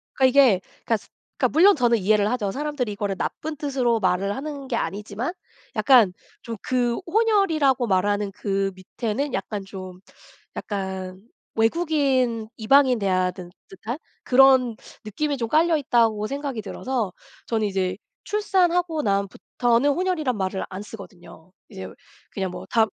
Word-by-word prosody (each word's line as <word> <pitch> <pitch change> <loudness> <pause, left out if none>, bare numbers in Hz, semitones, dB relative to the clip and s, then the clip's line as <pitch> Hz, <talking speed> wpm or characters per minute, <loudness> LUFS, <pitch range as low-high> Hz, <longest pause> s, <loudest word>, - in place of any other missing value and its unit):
그니까 265 - +3
이게 255 -8 +5 0.2
그러니까 225 - +2 0.4
그러니까 - - +1
물론 395 +5 +7
저는 240 -4 +3
이해를 205 +1 +2
하죠. 215 -6 -1
사람들이 290 -3 -3
이거를 205 -1 -2
나쁜 315 +9 -4
뜻으로 260 -6 0
말을 190 +2 +1
하는 280 -1 -6
게 255 - -2
아니지만 210 - -3 0.4
약간 240 -9 +5 0.3
좀 230 -2 -6
그 245 -2 0
혼혈이라고 330 - +2
말하는 205 +1 +1
그 195 0 -1
밑에는 225 +8 -3
약간 200 +1 -3
좀 185 -2 -9 0.6
약간 190 -2 -5 0.3
외국인, 255 -3 +1
이방인 255 +1 +4
대하든 185 -2 -1 0.2
듯한 220 +7 -6 0.3
그런 260 -2 +5 0.3
느낌이 285 +7 -2
좀 230 -2 -2
깔려 320 +1 +3
있다고 225 -6 +2
생각이 275 -4 -4
들어서 225 0 -3 0.4
저는 220 -2 0
이제 190 -1 -1 0.3
출산하고 355 -6 +1
난 200 -1 +1
부터는 240 +6 0
혼혈이란 310 - -1
말을 190 0 -2
안 190 +1 -6
쓰거든요. 185 -5 -12 0.2
이제 95 0 -8 0.4
그냥 190 -2 -3
뭐 - - -8
다 225 -1 +4
230 Hz, 315 characters per minute, -24 LUFS, 195-280 Hz, 0.6 s, 물론